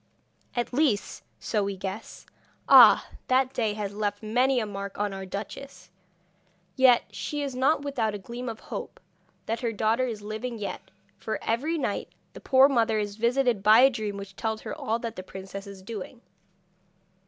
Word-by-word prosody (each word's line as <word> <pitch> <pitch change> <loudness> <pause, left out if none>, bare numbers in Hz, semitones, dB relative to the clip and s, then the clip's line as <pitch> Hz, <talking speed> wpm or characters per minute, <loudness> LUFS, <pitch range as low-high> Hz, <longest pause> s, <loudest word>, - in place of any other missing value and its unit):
At 240 0 -2
least, 255 -7 +1 0.2
so 210 -3 -1
we 200 -1 -3
guess. 190 +3 -7 0.4
Ah! - - +8 0.2
that 260 0 +2
day 220 -3 0
has 205 -2 -4
left 205 0 -2
many 250 +4 +2
a 220 - -1
mark 200 -1 -6
on 205 -1 -1
our 190 0 -6
duchess! 190 -1 -8 0.8
Yet 255 -2 +6
she 295 -1 -4
is 275 -2 -3
not 275 +3 +2
without 235 -7 -1
a - - -3
gleam 235 +5 -6
of 225 -1 -7
hope - - -7 0.5
that 225 +1 -2
her 235 -1 -1
daughter 225 +4 +1
is 215 -4 -5
living 220 +3 -5
yet, 210 - -6 0.3
for 220 - -3
every 290 +9 0
night 295 - -2 0.3
the - - -11
poor 265 0 +6
mother 230 -5 +2
is 205 -1 -2
visited 235 -1 +1
by 215 +4 +7
a 270 +1 +7
dream 215 -4 -4
which 195 -1 -9
tells 220 +1 -3
her - - -6
all 225 +1 -2
that 230 -1 -5
the - - -4
princess 190 +2 -9
is 195 -1 -11
doing.' 225 +3 -7
220 Hz, 175 wpm, -27 LUFS, 205-250 Hz, 0.8 s, Ah